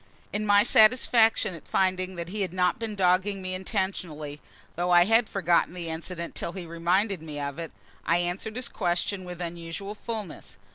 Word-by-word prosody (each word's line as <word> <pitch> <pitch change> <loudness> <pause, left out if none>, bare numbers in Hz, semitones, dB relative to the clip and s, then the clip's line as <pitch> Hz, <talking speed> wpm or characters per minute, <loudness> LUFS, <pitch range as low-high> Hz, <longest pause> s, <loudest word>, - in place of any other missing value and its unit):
In 210 +1 -1
my 205 0 +6
satisfaction 225 -3 +4
at 165 - -11
finding 185 0 0
that 170 0 -5
he 205 +2 -4
had 185 -3 -2
not 180 +1 +1
been 225 -2 -4
dogging 190 +1 +2
me 185 -1 -5
intentionally 175 -6 -3 0.3
(though 175 +1 -1
I 175 0 +6
had 225 +2 +3
forgotten 175 -2 +1
the 170 -2 -5
incident 170 +1 -5
till 170 - -4
he 185 -3 -6
reminded 175 +3 0
me 150 -2 -6
of 140 +2 -4
it), 165 -1 -5 0.3
I 170 - +2
answered 175 +5 -3
his 250 0 -2
question 185 +1 -1
with 180 -1 -8
unusual 170 +3 -5
fulness. 215 -4 -7
185 Hz, 180 wpm, -27 LUFS, 170-205 Hz, 0.3 s, my